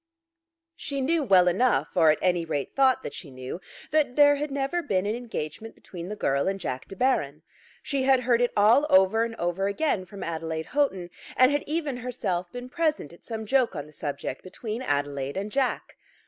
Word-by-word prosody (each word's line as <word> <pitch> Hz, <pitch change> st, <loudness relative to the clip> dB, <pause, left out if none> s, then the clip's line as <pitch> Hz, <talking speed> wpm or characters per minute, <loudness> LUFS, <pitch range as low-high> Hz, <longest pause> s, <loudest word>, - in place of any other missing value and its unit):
She 280 Hz, -1 st, -4 dB
knew 315 Hz, +5 st, +1 dB
well 185 Hz, -7 st, +5 dB
enough, 235 Hz, +8 st, +2 dB
or 165 Hz, -3 st, +5 dB
at 155 Hz, -, +4 dB
any 175 Hz, -2 st, +2 dB
rate 145 Hz, -4 st, -4 dB
thought 265 Hz, -1 st, +3 dB
that -, -, -6 dB
she 155 Hz, -, -8 dB
knew, 130 Hz, +6 st, -7 dB, 0.3 s
that 295 Hz, -5 st, +2 dB
there 290 Hz, -1 st, +6 dB
had 295 Hz, +1 st, -3 dB
never 275 Hz, +5 st, -1 dB
been 195 Hz, -, 0 dB
an 210 Hz, -, 0 dB
engagement 225 Hz, -4 st, -6 dB
between 175 Hz, 0 st, -9 dB
the 210 Hz, -, -4 dB
girl 140 Hz, -7 st, 0 dB
and 195 Hz, 0 st, -1 dB
Jack 130 Hz, -7 st, -4 dB
De 195 Hz, -, -8 dB
Baron. 155 Hz, -, 0 dB, 0.4 s
She 275 Hz, -2 st, -1 dB
had 265 Hz, -1 st, +4 dB
heard 240 Hz, -1 st, +2 dB
it 245 Hz, -, +2 dB
all 225 Hz, +8 st, +5 dB
over 190 Hz, +4 st, +5 dB
and 230 Hz, 0 st, -4 dB
over 175 Hz, +1 st, -1 dB
again 200 Hz, -3 st, -1 dB
from 200 Hz, +2 st, -8 dB
Adelaide 160 Hz, -1 st, -3 dB
Houghton, 195 Hz, -12 st, 0 dB, 0.3 s
and 255 Hz, +1 st, +6 dB
had 290 Hz, 0 st, 0 dB
even 300 Hz, -4 st, -2 dB
herself 185 Hz, -8 st, -3 dB
been 245 Hz, 0 st, -7 dB
present 310 Hz, -, -1 dB
at 170 Hz, -, -17 dB
some 220 Hz, -2 st, -5 dB
joke 250 Hz, -3 st, +2 dB
on 145 Hz, -2 st, -4 dB
the 150 Hz, -, -16 dB
subject 140 Hz, -3 st, -5 dB
between 215 Hz, +5 st, -6 dB
Adelaide 145 Hz, -, -2 dB
and 200 Hz, +2 st, -3 dB
Jack. 265 Hz, 0 st, -1 dB
210 Hz, 200 wpm, -26 LUFS, 170-265 Hz, 0.4 s, there